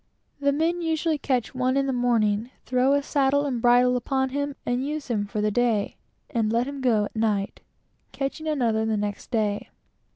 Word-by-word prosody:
The 280 0 +2
men 330 +4 0
usually 320 -1 0
catch 255 -4 -1
one 255 +1 +1
in 275 - +2
the 270 - -1
morning, 230 -3 +1 0.2
throw 255 +2 +2
a 285 0 +2
saddle 285 0 +2
and 250 -5 -2
bridle 245 +1 +5
upon 265 +1 0
him, 285 +1 -2
and 245 +1 0
use 295 0 -4
him 205 -3 0
for 210 0 -3
the 210 0 +1
day, 230 -2 +1 0.4
and 220 -2 0
let 235 +3 +1
him 280 -1 -6
go 225 -5 +2
at - - -10
night, 210 -3 0 0.5
catching 275 +3 -4
another 235 -8 +1
the 220 -1 0
next 205 0 -4
day. 210 -4 -1
250 Hz, 190 wpm, -25 LUFS, 220-280 Hz, 0.5 s, bridle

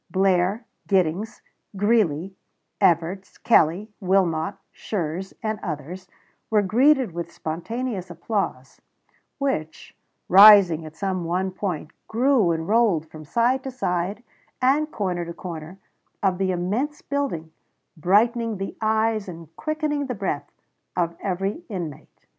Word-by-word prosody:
Blair, 190 +3 +2 0.2
Giddings, 190 +2 0 0.3
Greeley, 195 -4 +1 0.5
Evarts, 175 +3 +1
Kelley, 200 0 +3
Wilmot, 185 -2 +1 0.2
Schurz, 185 -1 -4
and 215 -1 -2
others 170 +3 -6 0.4
were 210 -2 +3
greeted 255 +3 +3
with 170 0 -5
spontaneous 190 +4 -4
applause, 170 - -3 0.6
which, 265 - -3 0.3
rising 190 -5 +8
at 155 - -12
some 190 -2 -2
one 180 +3 -1
point, 180 -5 -4 0.2
grew 240 -4 +3
and 160 0 -2
rolled 200 -8 +2
from 155 0 -10
side 240 - +1
to 270 - -4
side 200 -3 -2 0.4
and 280 +4 +2
corner 185 -8 -2
to 170 0 -7
corner 170 0 -7 0.5
of 190 -2 +2
the 190 -1 +1
immense 210 - -2
building, 270 - -3 0.4
brightening 220 +6 +2
the 195 +1 -5
eyes 220 -1 +1
and 165 -2 -10
quickening 305 -2 -2
the 250 - -3
breath 190 -8 -3 0.5
of 170 -1 0
every 195 - -2
inmate. 170 -9 -7
190 Hz, 120 wpm, -24 LUFS, 170-225 Hz, 0.6 s, rising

